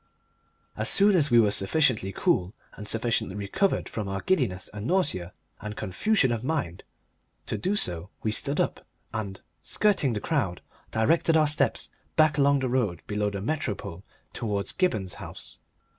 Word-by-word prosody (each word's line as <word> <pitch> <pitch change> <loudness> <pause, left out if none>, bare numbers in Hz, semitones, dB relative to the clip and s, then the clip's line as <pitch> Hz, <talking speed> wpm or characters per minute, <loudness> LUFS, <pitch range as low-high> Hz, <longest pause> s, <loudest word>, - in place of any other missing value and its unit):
As - - +2
soon 200 0 +5
as 150 -4 +3
we 120 - +6
were 105 -3 +4
sufficiently 105 -1 +2
cool 90 +1 0 0.2
and 105 - -9
sufficiently 115 -3 0
recovered 105 - 0
from 105 -3 -4
our 95 0 -3
giddiness 120 - 0
and 105 +2 -5
nausea 140 - 0 0.3
and 105 0 -6
confusion 130 - +1
of 115 -1 -2
mind 125 - -2 0.6
to - - -2
do 195 +3 -1
so 90 - +1
we 110 - +1
stood 140 +6 0
up - - -1 0.3
and, 100 -3 -4 0.2
skirting 195 - +2
the 105 - -2
crowd, 105 - -1 0.3
directed 160 +8 +3
our 155 - +5
steps 145 -4 0 0.2
back 155 -2 +4
along 140 0 +4
the 130 - 0
road 115 -10 0
below 105 0 -1
the 100 -1 -5
Metropole 105 - -3 0.3
towards 100 -3 -2
Gibberne's 110 - 0
house. - - -9
110 Hz, 160 wpm, -27 LUFS, 100-150 Hz, 0.6 s, we